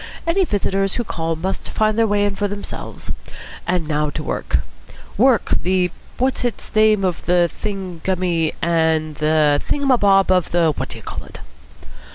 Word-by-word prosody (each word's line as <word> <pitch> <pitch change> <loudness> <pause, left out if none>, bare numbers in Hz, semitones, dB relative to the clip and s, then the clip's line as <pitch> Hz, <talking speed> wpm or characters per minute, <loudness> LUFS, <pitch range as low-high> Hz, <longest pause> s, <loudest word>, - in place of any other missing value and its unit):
Any 365 +3 +2
visitors 195 - 0
who 240 - -1
call 165 -6 -2
must 185 +4 -4
find 215 0 +1
their 225 0 +3
way 205 0 +2
in 200 -1 -1
for 205 +1 0
themselves. 205 0 -6 0.6
And 175 -3 0
now 150 -1 0
to - - -5
work. - - -1 0.5
Work, 250 +1 +3
the 180 -1 +1 0.3
what's 260 +1 +1
its 245 -2 -3
name 215 -2 +4
of 180 -2 -2
the 175 -1 +4
thingummy 180 -4 -2
and 160 -2 +1
the 150 -1 +3
thing 285 - -1
um 275 - +3
a 250 - +4
bob 195 -1 +4
of 180 -3 +2
the 170 -2 +3
what - - -4
d'you - - -9
call - - -6
it." - - -11
185 Hz, 175 wpm, -20 LUFS, 165-210 Hz, 0.6 s, name